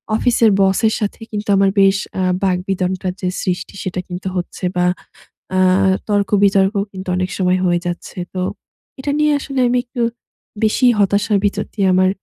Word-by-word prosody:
অফিসের 230 Hz, -2 st, +3 dB
বসের 195 Hz, +3 st, +3 dB
সাথে 205 Hz, -2 st, -3 dB
কিন্তু 210 Hz, 0 st, -4 dB
আমার 195 Hz, 0 st, +4 dB
বেশ 195 Hz, 0 st, +5 dB, 0.2 s
আ -, -, +1 dB, 0.2 s
বাগবিতণ্ডার 185 Hz, 0 st, -1 dB
যে 185 Hz, -, -1 dB
সৃষ্টি 180 Hz, +1 st, -3 dB
সেটা, 185 Hz, -1 st, -3 dB
কিন্তু 180 Hz, +1 st, -6 dB
হচ্ছে 180 Hz, +1 st, -5 dB
বা, 180 Hz, 0 st, +2 dB, 0.7 s
আ -, -, +2 dB, 0.5 s
তর্ক-বিতর্ক 200 Hz, -1 st, +3 dB, 0.2 s
কিন্তু 190 Hz, 0 st, -8 dB
অনেক 185 Hz, +1 st, -1 dB
সময় 185 Hz, -1 st, +2 dB
হয়ে 175 Hz, -1 st, +2 dB
যাচ্ছে। 175 Hz, +1 st, -5 dB, 0.2 s
তো 185 Hz, -, -2 dB, 0.6 s
এটা 285 Hz, +2 st, -2 dB
নিয়ে 300 Hz, 0 st, +3 dB
আসলে 275 Hz, -1 st, -3 dB
আমি 250 Hz, +1 st, +2 dB
একটু 240 Hz, 0 st, -4 dB, 0.6 s
বেশি 220 Hz, +4 st, +3 dB
হতাশার 205 Hz, +1 st, +2 dB
ভিতর 205 Hz, 0 st, 0 dB
দিয়ে 200 Hz, -3 st, +1 dB
আমার 185 Hz, 0 st, +4 dB
195 Hz, 155 wpm, -18 LUFS, 185-210 Hz, 0.7 s, বেশ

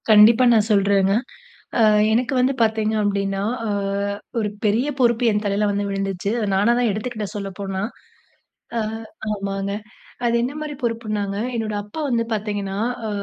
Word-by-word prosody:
கண்டிப்பா 220 Hz, +3 st, +7 dB
நான் 220 Hz, -2 st, +3 dB
சொல்றேங்க. 195 Hz, -1 st, +3 dB, 0.7 s
ஆ -, -, +5 dB, 0.3 s
எனக்கு 235 Hz, +3 st, +1 dB
வந்து 255 Hz, +2 st, +3 dB
பார்த்தீங்க 220 Hz, -1 st, +2 dB
அப்படின்னா, 195 Hz, -1 st, 0 dB, 0.3 s
ஆ -, -, -1 dB, 0.7 s
ஒரு 210 Hz, -2 st, 0 dB, 0.2 s
பெரிய 220 Hz, +6 st, +2 dB
பொறுப்பு 240 Hz, -1 st, +3 dB
என் 210 Hz, 0 st, 0 dB
தலையில 205 Hz, +1 st, +1 dB
வந்து 200 Hz, 0 st, -1 dB
விழுந்துச்சு. 195 Hz, -1 st, -2 dB
அத 220 Hz, -, 0 dB
நானா 205 Hz, +5 st, +4 dB
தான் 245 Hz, -2 st, +2 dB
எடுத்துக்கிட்ட 215 Hz, 0 st, -3 dB
சொல்லப்போனா. 195 Hz, -1 st, -4 dB, 1.0 s
அ. -, -, +2 dB, 0.5 s
ஆமாங்க. 195 Hz, -1 st, -3 dB, 0.5 s
அது 235 Hz, 0 st, +2 dB
என்ன 255 Hz, +3 st, -2 dB
மாரி 305 Hz, -1 st, -4 dB
பொறுப்புனாங்க, 215 Hz, -4 st, -2 dB, 0.2 s
என்னோட 220 Hz, -2 st, -2 dB
அப்பா 210 Hz, +10 st, -8 dB
வந்து 235 Hz, -2 st, +1 dB
பார்த்தீங்கன்னா 205 Hz, -2 st, -3 dB, 0.3 s
அ -, -, -2 dB
210 Hz, 145 wpm, -22 LUFS, 200-230 Hz, 1.0 s, கண்டிப்பா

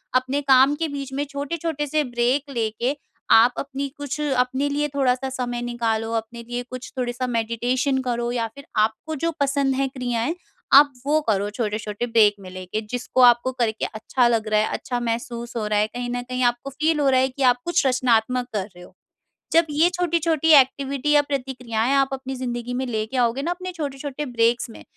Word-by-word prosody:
अपने 260 Hz, +3 st, +1 dB
काम 265 Hz, +2 st, +6 dB
के -, -, +1 dB
बीच 275 Hz, -1 st, -6 dB
में 280 Hz, +2 st, -1 dB
छोटे-छोटे 295 Hz, +1 st, -3 dB
से 305 Hz, +2 st, +1 dB
ब्रेक 250 Hz, +3 st, 0 dB
लेके, 235 Hz, +4 st, -1 dB, 0.4 s
आप 235 Hz, +2 st, +7 dB
अपनी 280 Hz, 0 st, -4 dB
कुछ 285 Hz, +1 st, -5 dB
अपने 265 Hz, 0 st, 0 dB
लिए 295 Hz, +1 st, 0 dB
थोड़ा 260 Hz, -3 st, +3 dB
सा 265 Hz, +1 st, -5 dB
समय 245 Hz, -2 st, -3 dB
निकालो, 230 Hz, -2 st, -1 dB
अपने 230 Hz, +1 st, -4 dB
लिए 245 Hz, +1 st, -4 dB
कुछ 255 Hz, 0 st, -8 dB
थोड़ा 245 Hz, -1 st, -1 dB
सा 255 Hz, +1 st, -3 dB
मेडिटेशन 245 Hz, +3 st, 0 dB
करो 240 Hz, 0 st, -1 dB
या 230 Hz, -2 st, -1 dB
फिर 280 Hz, -, -11 dB
आपको 220 Hz, +9 st, 0 dB
जो 335 Hz, -, +1 dB
पसंद 280 Hz, -1 st, +1 dB
है 270 Hz, +1 st, +1 dB
क्रियाएँ, 250 Hz, +3 st, -2 dB, 0.4 s
आप 285 Hz, +1 st, +8 dB
वो 305 Hz, +2 st, +3 dB
करो 205 Hz, -1 st, +1 dB
छोटे-छोटे 210 Hz, +1 st, -3 dB
ब्रेक 220 Hz, -3 st, +5 dB
में 185 Hz, -2 st, -10 dB
लेके 185 Hz, +3 st, -5 dB
जिसको 250 Hz, +1 st, -1 dB
आपको 240 Hz, +2 st, +3 dB
करके 220 Hz, -2 st, 0 dB
अच्छा 240 Hz, +3 st, 0 dB
लग 225 Hz, -2 st, +1 dB
रहा 215 Hz, 0 st, +3 dB
है, 215 Hz, -, +1 dB
अच्छा 245 Hz, -1 st, -3 dB
महसूस 235 Hz, 0 st, -4 dB
हो 215 Hz, -, -2 dB
रहा 210 Hz, -1 st, +1 dB
है, 210 Hz, -, +2 dB
कहीं 245 Hz, +2 st, -5 dB
न 245 Hz, -, -2 dB
कहीं 255 Hz, 0 st, -3 dB
आपको 240 Hz, +3 st, 0 dB
फील 310 Hz, +2 st, 0 dB
हो 280 Hz, -, +2 dB
रहा 260 Hz, -1 st, +4 dB
है 260 Hz, -, +3 dB
कि 265 Hz, +1 st, -4 dB
आप 245 Hz, -, -2 dB
कुछ 345 Hz, -4 st, +1 dB
रचनात्मक 250 Hz, -1 st, +2 dB
कर 200 Hz, -3 st, -1 dB
रहे 180 Hz, -, -12 dB
हो। -, -, -16 dB, 0.6 s
जब 330 Hz, +1 st, +5 dB
ये 310 Hz, +4 st, +3 dB
छोटी-छोटी 330 Hz, -2 st, +1 dB
एक्टिविटी 275 Hz, +2 st, -2 dB
या 295 Hz, -1 st, +6 dB
प्रतिक्रियाएँ 255 Hz, -3 st, -2 dB
आप 275 Hz, 0 st, +3 dB
अपनी 265 Hz, 0 st, -5 dB
ज़िंदगी 245 Hz, -1 st, -4 dB
में 260 Hz, +1 st, -2 dB
लेके 220 Hz, +2 st, -3 dB
आओगे 245 Hz, +2 st, +1 dB
ना 335 Hz, -, -1 dB
अपने 365 Hz, +1 st, -5 dB
छोटे-छोटे 290 Hz, -3 st, -5 dB
ब्रेक्स 235 Hz, -1 st, +1 dB
में, -, -, -12 dB
255 Hz, 200 wpm, -23 LUFS, 235-280 Hz, 0.6 s, आप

